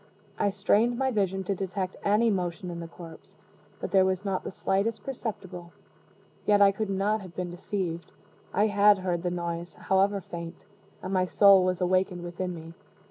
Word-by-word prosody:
I 205 Hz, -, +3 dB
strained 210 Hz, +4 st, +2 dB
my 265 Hz, 0 st, +1 dB
vision 195 Hz, -3 st, 0 dB
to 200 Hz, -, -1 dB
detect 190 Hz, 0 st, -3 dB
any 215 Hz, +3 st, +3 dB
motion 180 Hz, -2 st, -3 dB
in 170 Hz, -, -6 dB
the 170 Hz, -, -6 dB
corpse 165 Hz, -1 st, -13 dB, 0.4 s
but -, -, -5 dB
there 190 Hz, -1 st, +5 dB
was 190 Hz, +1 st, -1 dB
not 195 Hz, -2 st, -1 dB
the -, -, -5 dB
slightest 195 Hz, +4 st, -1 dB
perceptible. 195 Hz, -9 st, -6 dB, 0.7 s
Yet 205 Hz, -1 st, +5 dB
I 200 Hz, -1 st, +7 dB
could 210 Hz, +1 st, -3 dB
not 200 Hz, +3 st, 0 dB
have 185 Hz, -3 st, -11 dB
been 180 Hz, -1 st, -3 dB
deceived. 175 Hz, -2 st, -4 dB, 0.4 s
I 205 Hz, +3 st, +2 dB
had 205 Hz, -1 st, +5 dB
heard 180 Hz, -2 st, -2 dB
the 180 Hz, -, -1 dB
noise, 170 Hz, 0 st, -4 dB
however 195 Hz, +1 st, +2 dB
faint, 170 Hz, -2 st, -8 dB, 0.4 s
and 185 Hz, -, -4 dB
my 185 Hz, -1 st, +2 dB
soul 195 Hz, -1 st, +6 dB
was 185 Hz, 0 st, 0 dB
awakened 185 Hz, 0 st, +1 dB
within 175 Hz, +1 st, -4 dB
me. 165 Hz, 0 st, -10 dB
190 Hz, 180 wpm, -28 LUFS, 175-200 Hz, 0.7 s, I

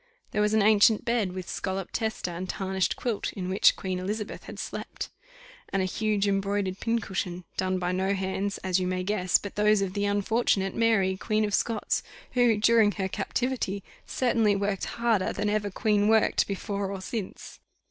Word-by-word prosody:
There 210 Hz, -, 0 dB
was 210 Hz, +1 st, +2 dB
an 215 Hz, -, +4 dB
ancient 215 Hz, +1 st, +5 dB
bed, 230 Hz, -5 st, +1 dB
with 185 Hz, -1 st, -6 dB
scolloped 190 Hz, -1 st, -4 dB
tester, 220 Hz, -5 st, -2 dB
and 180 Hz, +2 st, -5 dB
tarnished 190 Hz, -1 st, -1 dB
quilt, 235 Hz, -5 st, -2 dB
in 185 Hz, -2 st, -4 dB
which 190 Hz, +2 st, +5 dB
Queen 185 Hz, -1 st, -3 dB
Elizabeth 205 Hz, +3 st, -4 dB
had -, -, -9 dB
slept; -, -, -5 dB, 0.6 s
and 195 Hz, -1 st, 0 dB
a -, -, +1 dB
huge 210 Hz, +1 st, 0 dB
embroidered 195 Hz, -1 st, 0 dB
pincushion 190 Hz, -6 st, -2 dB
done 185 Hz, 0 st, 0 dB
by 180 Hz, 0 st, -1 dB
no 190 Hz, +2 st, 0 dB
hands, 195 Hz, +1 st, -2 dB
as 185 Hz, 0 st, +1 dB
you 180 Hz, -, -1 dB
may 185 Hz, 0 st, -1 dB
guess, 185 Hz, -2 st, +2 dB
but 200 Hz, -, -8 dB
those 210 Hz, 0 st, +3 dB
of 190 Hz, -1 st, -3 dB
the 205 Hz, 0 st, 0 dB
unfortunate 205 Hz, -1 st, +1 dB
Mary, 210 Hz, -5 st, +2 dB
Queen 215 Hz, +1 st, 0 dB
of 205 Hz, -, -3 dB
Scots, 225 Hz, 0 st, 0 dB, 0.3 s
who, 245 Hz, -3 st, +3 dB
during 220 Hz, -1 st, +4 dB
her 190 Hz, -2 st, -2 dB
captivity, 200 Hz, 0 st, -2 dB, 0.2 s
certainly 230 Hz, -5 st, +2 dB
worked 200 Hz, -1 st, -1 dB
harder 230 Hz, -5 st, 0 dB
than 205 Hz, 0 st, -1 dB
ever 210 Hz, -1 st, 0 dB
queen 205 Hz, +1 st, +1 dB
worked 220 Hz, 0 st, +3 dB
before 200 Hz, 0 st, -3 dB
or 195 Hz, -, -4 dB
since. 195 Hz, +1 st, -6 dB
200 Hz, 180 wpm, -27 LUFS, 190-215 Hz, 0.6 s, ancient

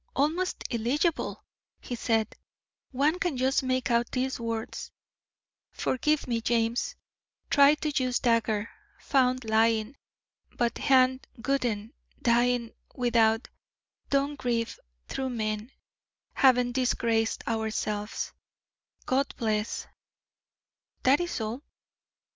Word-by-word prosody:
"Almost 325 Hz, +7 st, 0 dB
illegible," 280 Hz, +9 st, 0 dB, 0.4 s
he -, -, -7 dB
said; 225 Hz, -2 st, 0 dB, 0.5 s
"one 290 Hz, +6 st, +1 dB
can 350 Hz, -8 st, -1 dB
just 260 Hz, +2 st, +2 dB
make 255 Hz, -1 st, 0 dB
out 235 Hz, 0 st, +2 dB
these 260 Hz, 0 st, -1 dB
words: 230 Hz, -1 st, -4 dB, 0.8 s
'Forgive 300 Hz, +3 st, 0 dB
me, 230 Hz, -2 st, 0 dB
James 235 Hz, -, 0 dB, 0.6 s
tried 285 Hz, +1 st, +6 dB
to 305 Hz, -, 0 dB
use 250 Hz, -1 st, +1 dB
dagger 225 Hz, -2 st, +1 dB, 0.3 s
found 255 Hz, -3 st, +1 dB
lying 220 Hz, +2 st, +2 dB, 0.6 s
but 240 Hz, -2 st, 0 dB
hand 260 Hz, -1 st, +3 dB, 0.2 s
wouldn't 235 Hz, -6 st, 0 dB, 0.3 s
dying 240 Hz, 0 st, +2 dB, 0.2 s
without 230 Hz, -2 st, +2 dB, 0.6 s
don't 280 Hz, +1 st, +1 dB
grieve 230 Hz, -3 st, -1 dB, 0.3 s
true 265 Hz, -1 st, -3 dB
men 215 Hz, -1 st, -2 dB, 0.6 s
haven't 250 Hz, -2 st, +4 dB
disgraced 235 Hz, -3 st, 0 dB
ourselves 215 Hz, -2 st, -2 dB, 0.7 s
God 270 Hz, +2 st, +1 dB
bless 215 Hz, -2 st, -1 dB, 0.6 s
' -, -, -52 dB
That 270 Hz, +3 st, +5 dB
is 350 Hz, -4 st, -2 dB
all." 225 Hz, +4 st, -3 dB
245 Hz, 100 wpm, -28 LUFS, 225-270 Hz, 0.8 s, tried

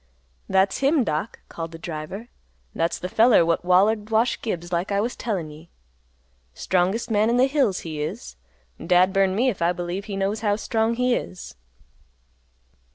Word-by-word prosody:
"That's 190 Hz, +1 st, +2 dB
him, 275 Hz, 0 st, +3 dB
Doc," 155 Hz, +4 st, -3 dB
called 165 Hz, 0 st, -6 dB
the 165 Hz, -, -9 dB
driver. 170 Hz, +7 st, -7 dB, 0.4 s
"That's 165 Hz, -, -1 dB
the 180 Hz, -, -5 dB
feller 220 Hz, -2 st, +4 dB
what 165 Hz, +1 st, 0 dB
wallered 205 Hz, +4 st, +3 dB
Wash 225 Hz, +2 st, +1 dB
Gibbs 175 Hz, -6 st, -4 dB
like 175 Hz, +4 st, -1 dB
I 200 Hz, -, +1 dB
was 235 Hz, +4 st, -1 dB
a -, -, -16 dB
tellin' 185 Hz, -9 st, -3 dB
ye. 155 Hz, +3 st, -14 dB, 0.9 s
Strongest 190 Hz, +6 st, 0 dB
man 215 Hz, +1 st, +3 dB
in 240 Hz, -, +2 dB
the 255 Hz, -, +5 dB
hills 265 Hz, -9 st, +1 dB
he 155 Hz, -3 st, -5 dB
is. 60 Hz, -, -5 dB, 0.5 s
Dad 180 Hz, +1 st, +3 dB
burn 195 Hz, -1 st, +2 dB
me 245 Hz, +6 st, +2 dB
if 205 Hz, -, -5 dB
I 170 Hz, +1 st, +2 dB
believe 175 Hz, +3 st, -4 dB
he 200 Hz, -2 st, -5 dB
knows 195 Hz, +2 st, -1 dB
how 205 Hz, -2 st, +1 dB
strong 225 Hz, +1 st, 0 dB
he 250 Hz, +1 st, +1 dB
is." 185 Hz, -, -5 dB
195 Hz, 175 wpm, -23 LUFS, 175-225 Hz, 0.9 s, the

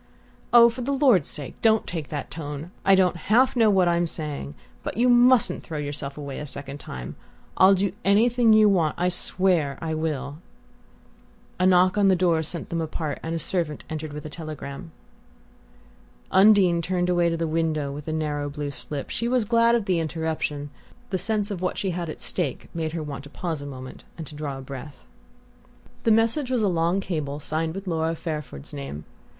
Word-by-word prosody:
"Oh, 235 Hz, -1 st, +9 dB
for 235 Hz, +2 st, -3 dB
the 260 Hz, +3 st, -2 dB
Lord's 260 Hz, -, +4 dB
sake 145 Hz, -3 st, -3 dB
don't 220 Hz, -1 st, +3 dB
take 160 Hz, -4 st, -5 dB
that 145 Hz, -2 st, -5 dB
tone! 150 Hz, +1 st, -6 dB
I 195 Hz, -, +6 dB
don't 185 Hz, -2 st, +3 dB
half 225 Hz, +12 st, +3 dB
know 225 Hz, -3 st, +5 dB
what 190 Hz, -3 st, +4 dB
I'm 170 Hz, 0 st, +2 dB
saying...but 145 Hz, -, -5 dB
you 245 Hz, +2 st, +3 dB
mustn't 245 Hz, -1 st, +5 dB
throw 160 Hz, -, -6 dB
yourself 145 Hz, -1 st, -5 dB
away 140 Hz, -2 st, -6 dB
a 150 Hz, -, -6 dB
second 140 Hz, +1 st, -5 dB
time. 65 Hz, -, -7 dB, 0.4 s
I'll 190 Hz, +1 st, +6 dB
do 195 Hz, 0 st, 0 dB
anything 230 Hz, +4 st, +4 dB
you 215 Hz, 0 st, +7 dB
want 170 Hz, -7 st, +2 dB
I 180 Hz, +1 st, +1 dB
swear 175 Hz, -5 st, +1 dB
I 160 Hz, -1 st, -3 dB
will!" 150 Hz, -2 st, -3 dB, 1.2 s
A 185 Hz, -, +4 dB
knock 185 Hz, +2 st, +4 dB
on 200 Hz, -, +4 dB
the 190 Hz, -, +5 dB
door 170 Hz, -3 st, +2 dB
sent 160 Hz, +2 st, -6 dB
them 170 Hz, -1 st, -2 dB
apart, 155 Hz, -2 st, -3 dB
and 165 Hz, +1 st, -3 dB
a -, -, 0 dB
servant 165 Hz, -2 st, -1 dB
entered 155 Hz, -1 st, -4 dB
with 150 Hz, +1 st, -8 dB
a -, -, -5 dB
telegram. 155 Hz, 0 st, -7 dB, 1.4 s
Undine 190 Hz, -4 st, +5 dB
turned 180 Hz, +1 st, -1 dB
away 175 Hz, -1 st, +2 dB
to 165 Hz, -, -1 dB
the 165 Hz, -, -1 dB
window 155 Hz, -3 st, -1 dB
with 145 Hz, +1 st, -7 dB
the 160 Hz, -, -3 dB
narrow 150 Hz, -2 st, -2 dB
blue 145 Hz, 0 st, -4 dB
slip. 140 Hz, 0 st, -6 dB
She 235 Hz, -, -1 dB
was 245 Hz, -2 st, +1 dB
glad 230 Hz, +1 st, +4 dB
of 230 Hz, -4 st, 0 dB
the 185 Hz, -3 st, +1 dB
interruption: 155 Hz, -3 st, -3 dB, 0.4 s
the 185 Hz, -, 0 dB
sense 210 Hz, +2 st, -1 dB
of 185 Hz, -3 st, -4 dB
what 180 Hz, -, -1 dB
she 195 Hz, -, -1 dB
had 170 Hz, -1 st, -4 dB
at -, -, -7 dB
stake 160 Hz, -9 st, -3 dB
made 160 Hz, -1 st, -3 dB
her 165 Hz, -2 st, -3 dB
want 140 Hz, -2 st, -6 dB
to -, -, -11 dB
pause 160 Hz, -1 st, -4 dB
a 145 Hz, -, -7 dB
moment 130 Hz, -2 st, -9 dB
and 165 Hz, -, -6 dB
to 150 Hz, -, -11 dB
draw 145 Hz, -2 st, -5 dB
breath. 135 Hz, +1 st, -9 dB, 1.0 s
The 225 Hz, -, +4 dB
message 230 Hz, +5 st, +2 dB
was 250 Hz, -4 st, +1 dB
a -, -, +3 dB
long 175 Hz, +1 st, +1 dB
cable 150 Hz, -6 st, -3 dB
signed 160 Hz, +2 st, -2 dB
with 195 Hz, +1 st, -6 dB
Laura 165 Hz, -2 st, -1 dB
Fairford's 150 Hz, -, -6 dB
name. 70 Hz, +2 st, -6 dB
165 Hz, 195 wpm, -25 LUFS, 150-195 Hz, 1.4 s, Oh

